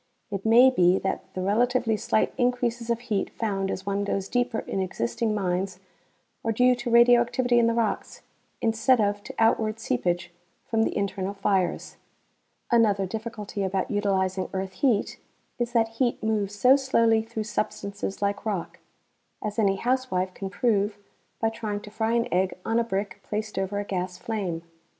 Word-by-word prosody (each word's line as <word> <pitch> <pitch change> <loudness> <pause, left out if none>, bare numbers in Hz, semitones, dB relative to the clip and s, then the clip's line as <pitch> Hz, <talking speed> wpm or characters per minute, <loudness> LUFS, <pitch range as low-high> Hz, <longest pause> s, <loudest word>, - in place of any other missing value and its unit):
It 200 +1 -3
may 245 +4 +7
be 180 -5 +4
that 190 - -3
the 185 - -2
relatively 230 +3 +2
slight 215 - 0
increases 245 -1 0
of 235 0 0
heat 215 -5 -1
found 195 -4 -2
as 190 - -4
one 200 0 -1
goes 195 -1 -2
deeper 245 -1 0
in - - -4
existing 185 - -1
mines 185 -1 -1 0.7
are 225 - 0
due 250 +3 +4
to 240 0 -4
radioactivity 240 +1 +5
in 230 - +4
the 230 - +1
rocks 230 -3 -2 0.4
instead 225 +3 +3
of 205 -1 +1
to - - -9
outward 225 -1 +2
seepage 175 - -1 0.3
from 225 -1 0
the - - 0
internal 200 0 -2
fires. 195 -2 0 0.7
Another 210 -4 +4
difficulty 215 0 -5
about 195 +5 -1
utilizing 190 -2 0
earth 190 0 -3
heat 220 +1 +1 0.4
is 240 0 -1
that 225 -2 +3
heat 245 -4 +1
moves 210 -2 0
so 250 +6 +6
slowly 230 -5 +3
through 220 0 -5
substances 200 -2 -3
like 200 0 -1
rock, 200 -6 -3 0.6
as 210 +1 -3
any 195 -3 +3
housewife 235 -6 -1
can 195 0 -5
prove 205 -1 +1 0.4
by 225 - +2
trying 220 -2 -4
to 210 - -12
fry 220 +1 0
an 235 0 +2
egg 185 +1 +1
on 225 +1 +2
a - - +2
brick 200 -2 -3
placed 215 -1 -4
over 195 +1 -2
a - - -2
gas 180 -2 -3
flame. 190 -7 -3
215 Hz, 165 wpm, -26 LUFS, 195-230 Hz, 0.7 s, may